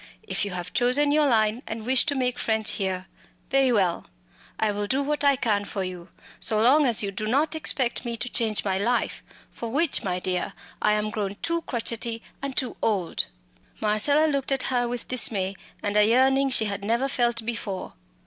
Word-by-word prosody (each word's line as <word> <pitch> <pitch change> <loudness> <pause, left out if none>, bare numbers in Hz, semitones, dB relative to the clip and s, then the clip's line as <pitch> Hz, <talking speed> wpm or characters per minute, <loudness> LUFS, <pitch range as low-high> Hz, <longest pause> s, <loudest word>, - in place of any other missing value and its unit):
If - - -2
you - - -4
have 180 -1 -6
chosen 265 +4 +3
your 300 0 +3
line 220 -1 +2
and 220 0 -5
wish 255 0 +3
to 285 - +1
make 250 -2 -1
friends 220 -1 +1
here 190 -2 -3 0.5
very 270 -1 +4
well 190 -7 +1 0.5
I 215 -1 +1
will 205 0 -3
do 265 +6 0
what 295 +1 -1
I 280 -1 +5
can 215 -6 0
for 200 -1 -4
you 180 -1 -7 0.3
so 215 - +2
long 270 +6 +5
as 230 -3 +3
you 200 - -2
do 215 +2 -4
not 285 +8 +1
expect 265 -7 +1
me 235 -2 -4
to 245 - -3
change 220 -4 0
my 190 -1 0
life 240 +4 0 0.3
for 230 - -6
which, 285 +5 +1
my 180 -2 -2
dear, 180 -1 -2 0.3
I 210 - +3
am 210 0 -1
grown 200 -2 -3
too 335 0 0
crotchety 230 -1 -2 0.2
and 275 -1 -5
too 255 -3 0
old." 195 -6 0 0.5
Marcella 220 +9 +3
looked 280 -3 0
at 270 -1 +2
her 245 -1 +1
with 240 0 -5
dismay 200 -6 +2 0.3
and 205 0 -1
a 210 - +6
yearning 265 +5 +3
she 240 -4 +3
had 200 -1 -4
never 235 +6 +1
felt 240 -4 +1
before. 220 -5 -4
230 Hz, 195 wpm, -25 LUFS, 205-265 Hz, 0.5 s, a